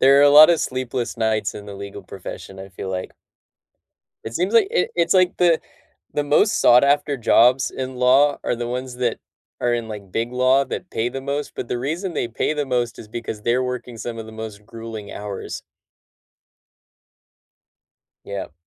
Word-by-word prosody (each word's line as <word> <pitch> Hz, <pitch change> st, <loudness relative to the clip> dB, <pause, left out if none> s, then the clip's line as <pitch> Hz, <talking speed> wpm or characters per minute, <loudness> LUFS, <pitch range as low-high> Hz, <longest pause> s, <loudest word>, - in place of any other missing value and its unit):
there 135 Hz, +1 st, +6 dB
are 140 Hz, -, +6 dB
a 145 Hz, -, +7 dB
lot 150 Hz, +2 st, +10 dB
of 170 Hz, -, +2 dB
sleepless 130 Hz, -1 st, -3 dB
nights 110 Hz, -3 st, 0 dB
in 105 Hz, 0 st, -9 dB
the 100 Hz, -, -8 dB
legal 100 Hz, 0 st, -8 dB
profession, 95 Hz, 0 st, -9 dB
I 95 Hz, -, -8 dB
feel 95 Hz, 0 st, -7 dB
like. 95 Hz, -1 st, -4 dB, 1.1 s
It 115 Hz, -, -6 dB
seems 185 Hz, -, -1 dB
like 220 Hz, -4 st, +5 dB
it 180 Hz, -, +1 dB
it's 170 Hz, +1 st, +2 dB
like 185 Hz, -1 st, +3 dB
the 170 Hz, -2 st, +3 dB, 0.5 s
the 145 Hz, -, 0 dB
most 150 Hz, +9 st, +3 dB
sought 120 Hz, +1 st, +6 dB
after 145 Hz, 0 st, +2 dB
jobs 125 Hz, +2 st, +4 dB
in 130 Hz, -1 st, -5 dB
law 135 Hz, +3 st, +4 dB
are 120 Hz, -, -1 dB
the 120 Hz, 0 st, -4 dB
ones 125 Hz, +1 st, -4 dB
that 125 Hz, -2 st, -1 dB, 0.4 s
are 120 Hz, 0 st, +1 dB
in, 115 Hz, -1 st, -3 dB
like, 100 Hz, -3 st, -9 dB
big 115 Hz, +2 st, -2 dB
law 130 Hz, +2 st, +3 dB
that 180 Hz, -, -6 dB
pay 115 Hz, +2 st, -1 dB
the 135 Hz, -, -6 dB
most, 140 Hz, +2 st, -3 dB
but 120 Hz, -, -5 dB
the 120 Hz, -, -2 dB
reason 165 Hz, +8 st, -3 dB
they 120 Hz, -, -1 dB
pay 115 Hz, -, -1 dB
the 145 Hz, -2 st, -2 dB
most 120 Hz, -2 st, -1 dB
is 105 Hz, -, -10 dB
because 110 Hz, -2 st, -6 dB
they're 120 Hz, +3 st, +1 dB
working 125 Hz, -1 st, -5 dB
some 115 Hz, +1 st, -6 dB
of 110 Hz, -, -7 dB
the 110 Hz, -, -11 dB
most 110 Hz, -2 st, -8 dB
grueling 115 Hz, -3 st, -8 dB
hours. 100 Hz, -1 st, -6 dB, 2.6 s
Yep. 100 Hz, -6 st, -6 dB
125 Hz, 190 wpm, -22 LUFS, 110-140 Hz, 2.6 s, lot